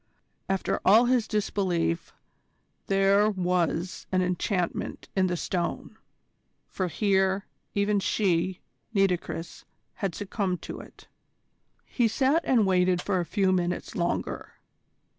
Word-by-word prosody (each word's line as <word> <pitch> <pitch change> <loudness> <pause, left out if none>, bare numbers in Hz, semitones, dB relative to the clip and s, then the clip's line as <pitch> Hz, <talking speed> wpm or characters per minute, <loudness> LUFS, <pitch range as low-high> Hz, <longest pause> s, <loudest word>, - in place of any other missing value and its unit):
After 195 -1 0
all 220 +5 +6
his 245 -2 +2
disbelief, 185 -5 -1 0.8
there 195 +2 +4
was 180 -2 -1
an 185 -1 +2
enchantment 180 0 -2
in 190 -1 +3
the 175 -1 -1
Stone, 175 +1 -3 0.7
for 185 - -2
here, 190 0 +1 0.3
even 205 0 +2
she, 185 -2 0 0.3
Nitocris, 180 -3 -1 0.3
had 195 -5 -3
succumbed 195 -3 -2
to - - -6
it. - - -14 0.8
He 240 -3 +1
sat 270 +8 +2
and 235 -5 +4
waited 180 -1 +3
for 185 0 0
a 175 - -1
few 195 -2 +2
minutes 180 -1 -1
longer. 170 0 -2
190 Hz, 115 wpm, -27 LUFS, 180-205 Hz, 0.8 s, all